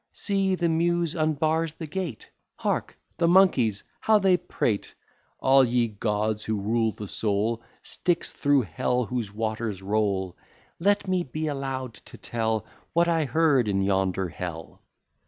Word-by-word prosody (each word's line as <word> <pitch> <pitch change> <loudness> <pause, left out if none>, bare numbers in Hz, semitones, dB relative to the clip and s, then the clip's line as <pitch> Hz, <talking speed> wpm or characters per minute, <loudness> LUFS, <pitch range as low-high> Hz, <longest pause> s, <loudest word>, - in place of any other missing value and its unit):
See, 195 -2 +1
the 175 -2 0
Muse 170 0 +1
unbars 155 0 0
the 165 - -6
gate; 160 - -5 0.2
Hark, - - -2 0.2
the 170 - +3
monkeys, 140 - +4 0.2
how 220 -1 +4
they 190 -3 +4
prate! 110 - -2 0.4
All 135 0 +5
ye 120 -1 +1
gods 105 0 -1
who 110 -1 -1
rule 110 +2 +1
the 105 -1 -8
soul: 110 +3 0 0.2
Styx, 175 -1 -1
through 145 -2 +2
Hell 120 +7 -1
whose 115 -4 -3
waters 110 -2 -3
roll! 100 -3 0 0.4
Let 200 +3 +2
me 185 -1 +1
be 155 +2 -4
allow'd 135 -4 -3 0.2
to - - -12
tell 110 -2 -2 0.3
What 170 +1 +3
I 165 -2 +2
heard 145 -5 +3
in 95 -1 +1
yonder 95 -1 +1
Hell. 85 -2 -7
125 Hz, 145 wpm, -26 LUFS, 105-165 Hz, 0.4 s, All